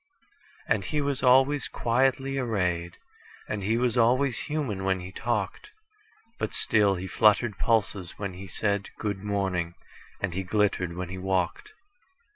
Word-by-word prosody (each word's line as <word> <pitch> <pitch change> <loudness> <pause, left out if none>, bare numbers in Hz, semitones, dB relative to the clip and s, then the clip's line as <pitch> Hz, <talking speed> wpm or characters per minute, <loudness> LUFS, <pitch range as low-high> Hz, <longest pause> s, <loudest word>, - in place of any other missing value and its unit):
And - - +1
he 150 - -1
was 140 -2 -1
always 135 +2 +4
quietly 135 +3 +1
arrayed, 90 -8 -1 0.5
And 105 - -3
he 110 +4 +1
was 120 -1 +1
always 125 +2 +3
human 130 -9 -3
when 95 -1 +1
he 90 +1 -8
talked; 105 -2 -2 0.7
But - - -2
still 105 -3 +3
he 90 +1 -5
fluttered 105 +3 +3
pulses 100 -5 0
when 100 -3 -4
he 95 +2 -9
said,"Good 100 +1 -2
morning," 95 -4 -1 0.4
and 95 -3 -2
he 95 - -1
glittered 95 -2 0
when 90 -1 -4
he 95 0 -6
walked. 95 - -1
105 Hz, 140 wpm, -27 LUFS, 95-125 Hz, 0.7 s, always